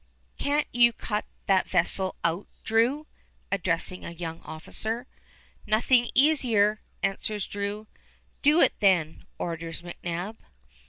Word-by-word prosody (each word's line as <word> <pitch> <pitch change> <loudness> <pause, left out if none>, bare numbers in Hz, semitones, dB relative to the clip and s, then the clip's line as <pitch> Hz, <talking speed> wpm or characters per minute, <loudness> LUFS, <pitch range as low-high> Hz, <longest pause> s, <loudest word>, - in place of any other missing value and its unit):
Can't 290 +1 +1
you 240 0 +6
cut 210 -2 -3 0.2
that 190 -1 +2
vessel 185 +1 +1
out, 170 +4 0 0.2
Drew?" 240 +7 +2 0.5
addressing 180 -1 0
a - - -5
young 165 -1 -6
officer. 220 +9 -3 0.6
"Nothing 235 +3 +3
easier," 235 -8 +4 0.2
answers 205 +1 -1
Drew. 205 +1 -4 0.6
"Do 300 +4 +5
it, - - +5
then," 175 -6 +2
orders 165 0 -4
McNab. 175 +4 -5
205 Hz, 110 wpm, -27 LUFS, 175-235 Hz, 0.6 s, you